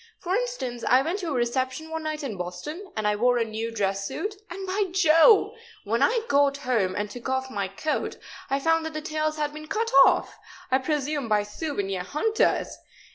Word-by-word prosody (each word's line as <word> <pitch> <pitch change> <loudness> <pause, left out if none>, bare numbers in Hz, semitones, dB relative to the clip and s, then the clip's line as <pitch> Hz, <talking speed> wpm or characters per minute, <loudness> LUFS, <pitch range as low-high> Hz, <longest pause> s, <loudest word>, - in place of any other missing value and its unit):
For 365 0 -3
instance, 410 - -3
I 255 +2 +5
went 345 +7 -2
to 360 - -4
a - - -2
reception 260 +5 -1
one 320 0 -3
night 310 -1 -4
in 245 -7 -4
Boston, 195 - -6
and 215 -1 0
I 210 - +2
wore 245 +3 +3
a 230 - +1
new 220 +1 -4
dress 195 -3 -1
suit, 415 +1 -4 0.2
and, 385 +2 -6
by 390 +2 0
Jove! 345 +4 +5 0.3
when 230 +4 -1
I 460 - +3
got 280 0 +3
home 230 -9 0
and 205 0 -1
took 240 +4 -8 0.2
my 200 -4 -2
coat 250 +11 -2
off - - -25 0.3
I 275 +1 +1
found 325 +2 +2
that 320 - -7
the 310 - -4
tails 310 0 -1
had 295 -1 -2
been 305 0 -9
cut 455 +6 -1
off - - +1 0.3
I 260 - +4
presume 290 -2 -2
by 210 -1 +3
souvenir 205 - -3
hunters! 365 - 0
280 Hz, 200 wpm, -26 LUFS, 225-320 Hz, 0.3 s, I